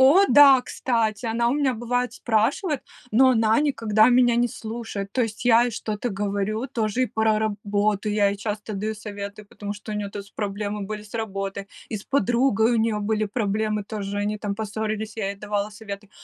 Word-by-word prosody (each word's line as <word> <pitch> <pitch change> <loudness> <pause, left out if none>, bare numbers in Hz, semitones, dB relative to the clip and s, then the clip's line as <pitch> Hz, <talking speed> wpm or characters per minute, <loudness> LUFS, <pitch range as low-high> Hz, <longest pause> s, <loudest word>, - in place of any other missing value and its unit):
О, 280 +9 +7
да, 275 -3 +8
кстати, 230 -2 -1
она 235 +1 +1
у 255 - +1
меня 275 -4 +1
бывает 245 +1 -1
спрашивает, 250 - 0 0.3
но 260 +4 +5
она 225 -1 +3
никогда 225 -6 +3
меня 245 -1 +4
не 240 0 +3
слушает, 220 -3 -6
то 255 - +1
есть 225 +1 -4
я 235 -1 +6
ей 245 -1 -1
что-то 215 +2 -3
говорю 205 +4 -2
тоже 220 +2 -1
и 255 - +2
про 220 -1 +1
работу, 210 -1 0
я 205 -1 +3
ей 200 - -2
часто 210 0 -4
даю 215 +2 -2
советы, 205 0 -7
потому 205 0 -7
что 210 +1 -9
у 210 - -2
нее-то 205 0 -4
с 200 - -19
проблемы 205 0 -3
были 210 +1 -5
с 210 +1 -16
работой, 195 -3 -4 0.2
и 215 - -3
с 200 - -9
подругой 240 -2 +2
у - - +2
нее 220 -1 +1
были 215 +1 0
проблемы 210 0 -1
тоже, 205 -1 -4
они 210 +1 -1
там 205 -1 -3
поссорились, 215 +1 -4
я 200 -2 -1
ей - - -5
давала 205 0 -2
советы. 205 -1 -8
215 Hz, 195 wpm, -24 LUFS, 205-235 Hz, 0.3 s, да